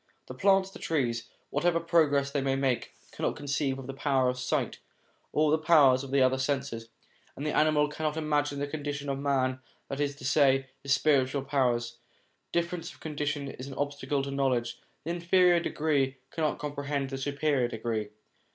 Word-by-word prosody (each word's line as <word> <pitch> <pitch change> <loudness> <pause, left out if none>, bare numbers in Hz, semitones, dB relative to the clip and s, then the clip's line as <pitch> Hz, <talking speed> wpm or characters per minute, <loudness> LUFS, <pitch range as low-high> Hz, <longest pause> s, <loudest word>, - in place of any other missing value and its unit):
The - - -8
plants, 195 -1 +3
the - - -11
trees, 120 -7 -1 0.2
whatever 165 +3 +2
progress 150 -5 +2
they 140 -1 0
may 135 0 +1
make, 135 -3 -1 0.2
cannot - - -2
conceive 140 -1 -1
of 135 - -8
the 135 - -6
power 135 -2 +1
of 125 0 -3
sight 125 - -1 0.5
or 150 0 +2
the 160 - +3
powers 145 -5 +5
of 135 - -7
the 135 0 +3
other 130 +1 +2
senses; 130 -4 -2 0.5
and 145 - -5
the 150 - -1
animal 150 -1 +4
cannot 155 +1 -3
imagine 145 -2 0
the 140 - -1
condition 145 -1 -4
of 135 0 -2
man, 130 -2 0 0.3
that 135 - -4
is 145 -1 0
to 135 - -10
say, 135 -1 +3
his 140 - -4
spiritual 140 -2 +3
powers. 125 -4 0 0.5
Difference 170 0 -2
of - - -18
condition 150 -2 -3
is 130 - -8
an 135 - -8
obstacle 145 0 -2
to 140 - -4
knowledge; 130 -4 0 0.2
the 165 - -3
inferior 175 +1 +4
degree 145 -5 0
cannot 155 -2 -1
comprehend 140 -2 -3
the 135 - -3
superior 140 -2 +1
degree. 110 -2 -3
140 Hz, 180 wpm, -29 LUFS, 135-150 Hz, 0.5 s, powers